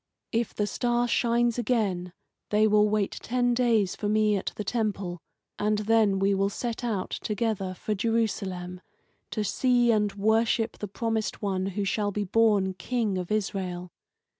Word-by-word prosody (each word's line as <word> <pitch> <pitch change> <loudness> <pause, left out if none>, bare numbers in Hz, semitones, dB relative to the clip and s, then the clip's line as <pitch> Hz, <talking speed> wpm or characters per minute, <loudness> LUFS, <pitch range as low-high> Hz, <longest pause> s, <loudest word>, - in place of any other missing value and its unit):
If 230 0 -1
the 210 - 0
star 240 +3 0
shines 235 0 +2
again, 200 -7 0 0.4
they 210 +1 +4
will 210 0 +4
wait 210 -2 +1
ten 245 0 +1
days 230 -6 +2
for 205 - -2
me 215 0 +3
at 195 - -2
the 210 - -4
temple, 200 -5 -2 0.4
and 210 0 +1
then 215 -2 +3
we 195 +1 +2
will 195 0 +1
set 235 +3 -4
out 210 -6 -2
together 210 -3 -2
for 215 - -3
Jerusalem, 195 -5 -2 0.5
to 215 - -2
see 245 +3 +3
and 210 -2 +2
worship 220 +2 +1
the 210 - -4
promised 220 +1 -2
one 190 -2 -1
who 205 - 0
shall 205 +2 0
be 205 +1 -2
born 205 -2 +2
King 205 +1 -1
of 180 +1 -5
Israel. 185 -4 -2
210 Hz, 160 wpm, -27 LUFS, 195-230 Hz, 0.5 s, they